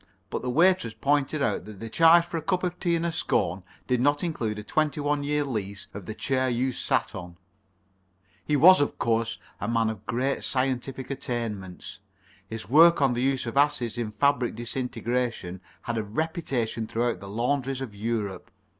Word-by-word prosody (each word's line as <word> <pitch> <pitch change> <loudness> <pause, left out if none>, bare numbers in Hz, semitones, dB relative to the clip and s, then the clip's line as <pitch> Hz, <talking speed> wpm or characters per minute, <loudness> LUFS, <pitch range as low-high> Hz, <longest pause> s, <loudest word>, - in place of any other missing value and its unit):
But - - -2
the 125 - -3
waitress 165 -5 +3
pointed 145 +1 +1
out 95 - -1
that 105 -2 -10
the 115 - -6
charge 165 +7 +6
for 170 - -4
a - - -2
cup 180 +3 -1
of 180 -1 -2
tea 175 -2 +1
and 165 0 -1
a 170 - 0
scone 95 - 0 0.2
did 125 -1 +1
not 145 +4 +2
include 115 -11 -2
a 105 - -6
twenty 155 +6 0
one 145 0 0
years' 145 0 0
lease 100 -6 -4
of 100 -3 -8
the 110 - -5
chair 130 0 0
you 125 +2 0
sat - - 0
on. 85 0 -8 1.1
He 150 - 0
was, 175 +4 +8
of 145 - -1
course, 115 0 0 0.2
a 100 - -3
man 115 -1 +1
of 105 -2 -9
great 130 +4 -1
scientific 130 0 -2
attainments. 110 -11 -5 0.5
His 110 -3 -6
work 165 +7 +7
on 135 -3 +3
the 120 - -1
use 135 0 +1
of 115 +3 -4
acids 135 -5 +2
in 120 -3 -2
fabric 135 +2 +1
disintegration 120 -5 -3 0.2
has 120 - -3
a 110 - 0
reputation 120 -3 -2
throughout 115 -3 -1
the 100 +1 -9
laundries 130 +4 -1
of 130 -6 -6
Europe. 105 -3 -3
125 Hz, 185 wpm, -26 LUFS, 110-145 Hz, 1.1 s, was